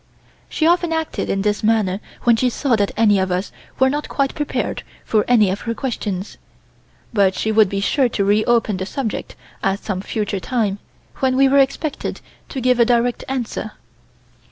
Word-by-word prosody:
She 315 - 0
often 345 0 +3
acted 320 -1 -2
in 195 0 0
this 205 -1 0
manner 210 -4 +1 0.2
when 235 -1 +5
she 250 +2 +1
saw 250 0 +1
that 205 -2 +1
any 210 -3 +4
of 190 -1 0
us 180 +2 -2 0.3
were 265 - +4
not 295 +3 -2
quite 275 -1 0
prepared 295 -1 -2 0.2
for 215 -2 +2
any 215 -6 +4
of 195 - -4
her 230 - -1
questions, 210 -7 -4 0.7
but 195 -3 +3
she 220 - -1
would 215 -2 +4
be 195 0 -2
sure 260 +5 +2
to 200 -3 -1
reopen 215 0 +2
the 190 +1 -4
subject 250 -3 -4 0.3
at 195 0 +1
some 190 -3 -3
future 205 -1 -2
time, 205 -2 -1 0.4
when 260 -1 +1
we 270 0 +6
were 280 +1 +4
expected 275 +2 -1 0.3
to 270 - -4
give 250 0 +2
a 235 - +6
direct 240 0 +1
answer. 240 -4 -3
225 Hz, 180 wpm, -20 LUFS, 200-265 Hz, 0.7 s, we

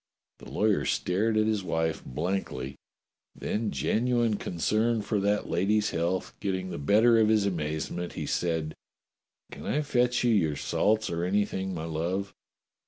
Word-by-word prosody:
The - - -11
lawyer 105 -1 +2
stared 110 +5 +1
at 110 - +3
his 110 -3 0
wife 80 -2 -1
blankly, 70 -3 -3 0.6
then 110 0 -2
genuine 120 -1 +1
concern 110 +7 0
for 105 0 0
that 100 +1 +1
lady's 105 +4 +1
health 85 +3 -1
getting 95 -1 -2
the - - -5
better 110 +10 +5
of 110 - +4
his 110 -2 +3
amazement, 85 0 -3
he - - -4
said: 80 -3 -1 0.8
"Can - - -8
I 150 - +1
fetch 125 -3 +1
you 120 - +3
your 80 -9 +2
salts 110 +8 +1
or 85 0 -2
anything, 95 0 0
my 80 -1 -4
love? 85 +5 -2
100 Hz, 150 wpm, -28 LUFS, 85-110 Hz, 0.8 s, better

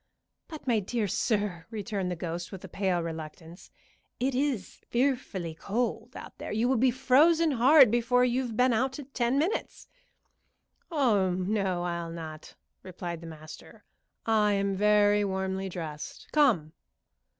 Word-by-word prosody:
"But, 310 -3 -9
my 235 -4 +2
dear 210 +2 -2
sir," 200 -5 -1
returned 205 -4 -3
the 180 - -2
ghost, 170 +1 -5
with 190 -3 -9
a - - -7
pale 185 -3 -1
reluctance, 160 +1 -8 0.5
"it 260 +2 0
is 255 -7 -2
fearfully 240 - -1
cold 225 +9 -3
out - - -10
there. - - -6
You 220 +3 +1
will 260 0 +2
be 255 +3 +4
frozen 300 +6 +4
hard 265 0 +6
before 245 +1 +3
you've 245 -2 -1
been 250 0 +4
out 260 +4 0 0.2
ten 240 +2 +1
minutes." 335 +9 -2 1.0
"Oh 235 - +2
no, 185 0 -1
I'll 170 -1 -3
not," 160 -2 -8 0.3
replied 175 -2 -6
the 165 - -9
master. 155 +7 -12 0.4
"I 215 -2 +3
am 200 0 0
very 205 +1 +4
warmly 190 0 -2
dressed. 160 -4 -7
Come!" 220 - +3
205 Hz, 140 wpm, -28 LUFS, 175-250 Hz, 1.0 s, hard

